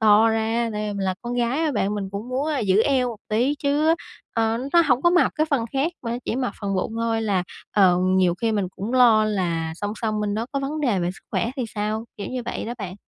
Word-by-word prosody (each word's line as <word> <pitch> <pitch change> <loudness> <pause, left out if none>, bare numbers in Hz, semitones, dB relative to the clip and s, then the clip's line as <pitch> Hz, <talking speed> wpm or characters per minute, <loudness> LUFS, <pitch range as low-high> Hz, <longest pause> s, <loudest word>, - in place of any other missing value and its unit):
to 220 +1 +6
ra, 225 +1 0
tại 210 0 -3
vì - - -3
mình 195 -1 -2
là 185 -1 0
con 240 +1 -4
gái 245 +4 0
á 315 -2 +1
bạn 205 -2 0
mình 195 -2 -3
cũng 205 +5 -6
muốn, 265 +4 -1
a, 300 -3 0
giữ 205 +1 +3
eo 260 -3 +2
một 230 - -6
tí 245 +7 +2
chứ, 295 +3 +2 0.4
ờ, 225 0 +1
nó 340 0 +6
hổng 250 -2 +2
có 345 - +5
mập 355 - +3
cái 310 0 +1
phần 265 -6 +1
khác 285 +6 0
mà 235 0 -2
chỉ 235 - -2
mập 255 -2 -1
phần 200 -1 -2
bụng 185 - -2
thôi 230 -1 0
là, 195 -4 +1 0.3
ờ, 185 -4 +5 0.2
nhiều 180 -2 +3
khi 225 -1 +1
mình 200 -4 0
cũng 215 +6 -4
lo 235 -4 +6
là 170 -6 -1
song 205 +4 -4
song 215 -2 -1
bên 205 -1 -1
đó 225 +2 -2
có 275 - -1
vấn 300 +3 -3
đề 235 -9 +1
về 175 0 0
sức 190 - -13
khỏe 230 - 0
thì 255 - -1
sao? 215 +2 -2
Kiểu 205 - -5
như 255 -1 -3
vậy - - -4
đó 240 +2 -4
bạn. 190 -3 -5
225 Hz, 265 wpm, -23 LUFS, 205-255 Hz, 0.4 s, to